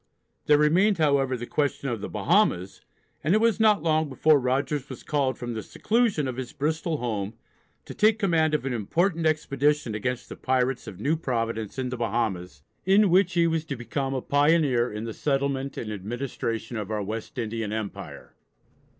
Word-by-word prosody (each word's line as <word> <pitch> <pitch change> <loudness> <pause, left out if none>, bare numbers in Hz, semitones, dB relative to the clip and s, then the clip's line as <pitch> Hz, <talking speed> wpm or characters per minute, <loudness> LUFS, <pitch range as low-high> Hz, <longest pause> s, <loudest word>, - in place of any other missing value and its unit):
There 150 - +6
remained, 175 +7 +3
however, 140 -4 +2
the 120 - -5
question 145 +1 -1
of 115 -4 -3
the - - -5
Bahamas, 105 - +1 0.4
and 165 +7 +3
it - - +4
was 225 -1 +2
not 215 -2 +4
long 155 -2 +1
before 150 +2 +4
Rogers 135 +2 -1
was 130 - -8
called 140 -3 0
from 120 -1 -5
the 110 - -4
seclusion 215 - 0
of 130 -1 -4
his 130 -2 -5
Bristol 160 +2 -1
home 110 -4 -3 0.5
to - - -8
take 215 +1 +3
command 165 -6 +2
of 150 - -2
an 135 - -1
important 165 - 0
expedition 150 -4 +1
against 120 +4 -3
the - - -8
pirates 130 0 0
of 95 - -9
New 145 +8 +1
Providence 115 -6 -3
in 130 -1 -2
the 125 - -4
Bahamas, 95 -10 -2 0.2
in 195 0 +4
which 185 0 +4
he 170 -1 +3
was 165 -1 0
to 140 - -4
become 135 +3 -3
a 130 - -3
pioneer 145 -4 +3
in 105 +1 -5
the 115 -1 -5
settlement 140 0 -1
and 110 - -4
administration 115 +2 -4
of 105 -2 -4
our 105 -1 -2
West 110 +6 -6
Indian 115 -2 -3
Empire. 110 -2 -6
135 Hz, 185 wpm, -26 LUFS, 115-155 Hz, 0.5 s, There